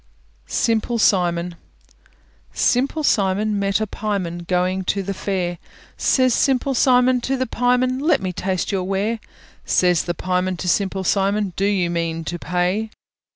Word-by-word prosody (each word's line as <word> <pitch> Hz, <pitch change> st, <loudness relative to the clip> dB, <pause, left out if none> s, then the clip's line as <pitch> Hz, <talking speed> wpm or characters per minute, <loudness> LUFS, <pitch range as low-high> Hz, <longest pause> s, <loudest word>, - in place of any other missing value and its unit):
SIMPLE 230 Hz, +1 st, 0 dB
SIMON 175 Hz, -4 st, +1 dB, 1.0 s
Simple 275 Hz, +5 st, +1 dB
Simon 205 Hz, -2 st, +1 dB
met 195 Hz, 0 st, +1 dB
a 215 Hz, -, 0 dB
pieman, 185 Hz, -5 st, -4 dB
Going 185 Hz, +1 st, 0 dB
to 195 Hz, +2 st, -1 dB
the 195 Hz, +1 st, -3 dB
fair; 180 Hz, -3 st, -3 dB, 0.4 s
Says 255 Hz, -2 st, +2 dB
Simple 270 Hz, +1 st, +1 dB
Simon 250 Hz, 0 st, +3 dB
to 270 Hz, +2 st, -1 dB
the 260 Hz, -, 0 dB
pieman, 250 Hz, +2 st, +1 dB
"Let 310 Hz, +4 st, +2 dB
me 185 Hz, -1 st, -3 dB
taste 185 Hz, +1 st, -2 dB
your 190 Hz, -2 st, -1 dB
ware." 200 Hz, +4 st, -1 dB, 0.4 s
Says 180 Hz, -3 st, +2 dB
the 175 Hz, -, -2 dB
pieman 185 Hz, +1 st, -1 dB
to 180 Hz, -, -5 dB
Simple 190 Hz, +1 st, 0 dB
Simon, 200 Hz, 0 st, +1 dB
"Do 195 Hz, -, 0 dB
you 190 Hz, -4 st, +1 dB
mean 165 Hz, -1 st, -2 dB
to 175 Hz, +2 st, -5 dB
pay?" 180 Hz, +6 st, -1 dB
195 Hz, 150 wpm, -21 LUFS, 180-230 Hz, 1.0 s, Simon